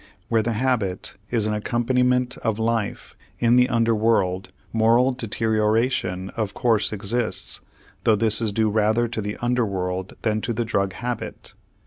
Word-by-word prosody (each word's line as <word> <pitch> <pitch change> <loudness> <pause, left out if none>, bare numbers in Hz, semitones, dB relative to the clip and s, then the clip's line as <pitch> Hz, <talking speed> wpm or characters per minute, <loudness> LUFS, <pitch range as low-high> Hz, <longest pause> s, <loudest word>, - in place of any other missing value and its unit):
Where 115 -1 +3
the 115 +1 -1
habit 110 -6 -1
is 115 -3 0
an 105 - 0
accompaniment 125 +3 +1
of 110 -2 -1
life 115 -2 -2 0.2
in 120 0 +3
the 125 +1 +4
under 115 -1 +2
world, 100 -4 +1 0.2
moral 115 +3 +4
deterioration 110 -4 0
of 105 -3 -3
course 115 -4 +2
exists, 110 +3 -2 0.4
though 110 - +4
this 110 +1 +2
is 110 -2 0
due 110 +1 +1
rather 110 +2 +2
to 115 -1 -4
the 105 0 -4
under 125 0 +2
world 95 -2 -3
than 110 -1 +1
to 120 - -2
the 115 +1 -1
drug 100 -4 0
habit. 120 +4 -5
110 Hz, 155 wpm, -23 LUFS, 105-120 Hz, 0.4 s, the